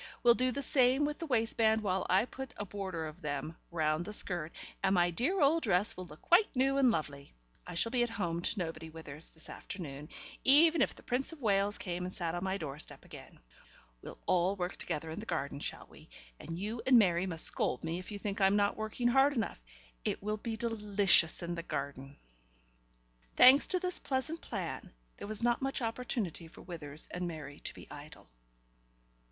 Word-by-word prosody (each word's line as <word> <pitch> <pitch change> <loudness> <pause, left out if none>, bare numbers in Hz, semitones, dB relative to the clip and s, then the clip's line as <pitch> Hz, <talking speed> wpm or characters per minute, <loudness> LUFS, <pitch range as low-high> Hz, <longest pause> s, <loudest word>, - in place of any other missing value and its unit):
will 240 -1 +7
do 255 +2 +1
the 280 +3 -2
same 265 +1 +3
with 295 0 -3
the 330 - -5
waistband 225 -3 +2
while 190 -2 -1
I 190 +5 +4
put 265 +1 -8
a 205 - -4
border 190 -4 -4
of 155 0 -9
them 150 +2 -4
round 155 -1 0
the 210 - -5
skirt, 175 -6 +2 0.3
and 190 - +2
my 175 -1 +3
dear 270 - 0
old 315 +3 +4
dress 200 - +2
will 185 0 -8
look 150 0 -14
quite 355 -1 +4
new 270 +2 +2
and 265 -2 +5
lovely. 145 - -3 0.3
I 180 - -7
shall 230 +7 +1
be 245 -1 +2
at 240 - +1
home 175 -7 -2
to 210 - -1
nobody, 165 -3 -4
Withers, 160 -1 -6
this 160 - -10
afternoon, 150 -5 -7 0.3
even 320 +4 +6
if - - +1
the - - -16
Prince 255 +5 +1
of 310 - -13
Wales 200 -1 +2
came 180 -1 -4
and 180 - -4
sat 170 -3 -3
on 175 +1 -3
my 190 0 -1
doorstep 150 -3 -7
again. - - -12 0.6
We'll - - -9
all 180 +2 +2
work 180 -1 -3
together 160 +2 -4
in 160 - -5
the 220 - -8
garden, 140 -7 -3
shall - - -4
we, - - -17 0.3
and 165 +1 -6
you 215 +5 -4
and 260 -2 +7
Mary 185 -4 +3
must 165 -3 +1
scold 125 - +2
me 165 +2 -2
if 185 - -9
you 205 - -4
think 200 0 -4
I'm 195 +1 +5
not 205 -1 +2
working 220 +3 -2
hard 270 +3 +4
enough. 225 - -3 0.4
It - - -2
will 210 +1 -1
be 220 +1 -5
delicious 205 -7 +3
in 170 0 -3
the 170 - -4
garden." 140 -3 -5 1.2
Thanks 260 +3 +8
to 365 - +1
this 360 0 +4
pleasant 280 +5 -2
plan, 185 - -5 0.2
there - - -7
was 215 +1 -1
not 240 +2 +2
much 270 0 -1
opportunity 225 - -3
for 160 - -14
Withers 155 -4 -7
and 180 0 -3
Mary 155 -3 -7
to - - -4
be - - -11
idle. 150 - -11
195 Hz, 205 wpm, -32 LUFS, 165-240 Hz, 1.2 s, Thanks